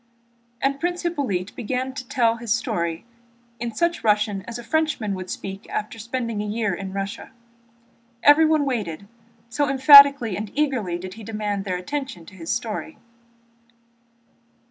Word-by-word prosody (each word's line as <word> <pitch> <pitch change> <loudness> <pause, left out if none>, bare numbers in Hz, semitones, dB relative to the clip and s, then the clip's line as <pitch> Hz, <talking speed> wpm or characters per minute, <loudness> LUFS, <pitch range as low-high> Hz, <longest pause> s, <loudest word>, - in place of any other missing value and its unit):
And 275 +1 +1
Prince 350 +2 -2
Hippolyte 255 - -2
began 255 +3 -3
to 255 -1 -7
tell 235 -3 +2
his 230 -2 -5
story 170 -6 -1 0.5
in 235 0 -3
such 340 +4 0
Russian 210 -2 +2
as 235 0 -5
a 240 - -8
Frenchman 305 -6 0
would 185 -1 -6
speak 195 0 -7
after 215 +1 -4
spending 230 -1 -3
about 210 - -4
a - - -2
year 220 -4 0
in 190 +1 -5
Russia. 195 +3 -5 0.9
Everyone 310 0 +5
waited, 200 - -3 0.4
so 285 +4 -1
emphatically 275 -4 +8
and 210 +1 -5
eagerly 250 -12 0
did 185 +1 -8
he 225 +2 -11
demand 210 -2 -3
their 185 -2 -2
attention 260 - -5
to 200 - -14
his 170 -3 -9
story. 235 +6 -3
230 Hz, 150 wpm, -23 LUFS, 200-275 Hz, 0.9 s, emphatically